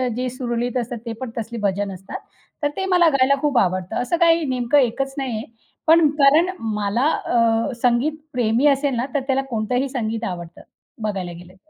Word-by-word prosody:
जे 255 +1 -2
सुरळीत 245 -1 -2
असतात 245 0 -3
ते 230 - -4
पण 255 - -4
तसले 230 +1 -4
भजन 200 0 -1
असतात. 190 +1 -8 0.4
तर 290 - +3
ते 385 - -1
मला 360 -3 +4
गायला 275 +1 +4
खूप 290 -4 +1
आवडतं. 185 -2 -1
असं 290 +8 0
काही 335 -1 +4
नेमकं 250 +2 +1
एकच 270 +2 0
नाही 260 -4 -2
आहे. 220 - -5 0.4
पण 325 -1 +6
कारण 305 +6 +5
मला 215 +3 -1 0.2
अ, 230 +2 +2
संगीत 245 +5 +2 0.2
प्रेमी 245 +3 +2
असेल 275 -1 +2
ना, 240 +2 -1
तर 285 - +2
त्याला 270 0 +2
कोणतंही 245 +4 -1
संगीत 225 -4 -3
आवडतं, 175 -1 -9 0.4
बघायला 195 -5 -3
गेलं 175 +1 -12
तर. 190 +11 -28
245 Hz, 185 wpm, -21 LUFS, 215-275 Hz, 0.4 s, पण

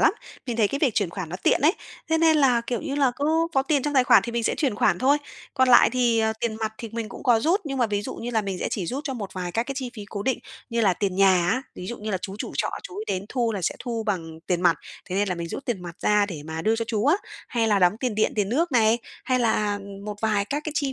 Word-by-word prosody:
lắm. - - +5 0.3
Mình 235 -2 -2
thấy 210 -3 +3
cái 275 - -2
việc 270 -8 +2
chuyển 200 -5 +1
khoản 180 -3 -5
nó 180 - -5
tiện - - +3
ấy, 310 +5 +5 0.4
thế 320 0 +2
nên 320 -2 +4
à, 250 -4 +4
kiểu 240 - -1
như 280 -3 -4
là, 275 -3 +3
cứ 285 - -2 0.3
có 270 - +4
tiền 285 -2 +1
trong 295 -1 -2
tài 255 -1 +5
khoản - - +6
thì 235 - -5
mình 235 -1 -1
sẽ - - +1
chuyển 275 -9 0
khoản 180 -3 +2
thôi, 280 +3 +3 0.4
còn 260 -1 +3
lại 245 - +7
thì, 240 -2 +2
ờ, 220 0 +2
tiền 230 -2 -1
mặt 220 0 -1
thì 230 - -6
mình 225 -2 -4
cũng - - -10
có 240 -4 +4
rút, 355 - +2
nhưng 275 -3 -3
mà 240 - +3
ví 205 -1 -1
dụ - - -5
như 240 +1 -5
là 220 -2 +1
mình 195 -2 -4
sẽ - - -2
chỉ 185 -5 -2
rút 280 - -4
cho 270 -3 -3
một 200 -5 -6
vài 180 -2 -4
các 230 - +1
cái 275 +2 -5
chi 260 -2 -4
phí 210 -2 -7
cố 200 -1 -4
định 260 - 0 0.3
như 230 0 0
là 195 -4 +4
tiền 190 -1 -2
nhà 185 -3 +4
á. 255 +6 +1
Ví 180 - -7
dụ 240 - -5
như 215 0 -4
là 190 - 0
chú 195 - -5
chủ - - -5
trọ - - 0
chú - - -9
ấy 430 - -4
đến 190 +1 -2
thu 235 -3 0
là 195 -3 -4
sẽ - - 0
thu 230 -2 -3
bằng 165 -5 -3
tiền 180 -1 0
mặt, 170 -3 +4 0.3
thế 185 - -4
nên 205 0 +1
là 180 - 0
mình 170 -1 -5
rút 275 - -6
tiền 210 -7 -2
mặt 175 +1 -8
ra 210 -1 +3
để 160 -7 -7
mà 160 0 -4
đưa 225 +1 +2
cho 230 - -1
chú 215 0 0
á, 320 +6 +5 0.3
hay 225 -2 +1
là 205 -2 +3
đóng 180 +3 +4
tiền 250 -5 -1
điện, 215 - +1
tiền 200 -2 +1
nước 310 +6 0
này, 225 -1 +4 0.3
hay 255 -1 +1
là, 215 -3 +1
ừm, 200 0 -10
một 210 -1 -4
vài 210 -2 +1
các 290 +7 -2
cái 310 - -3
chi 280 -4 0
225 Hz, 315 wpm, -25 LUFS, 200-260 Hz, 0.4 s, lại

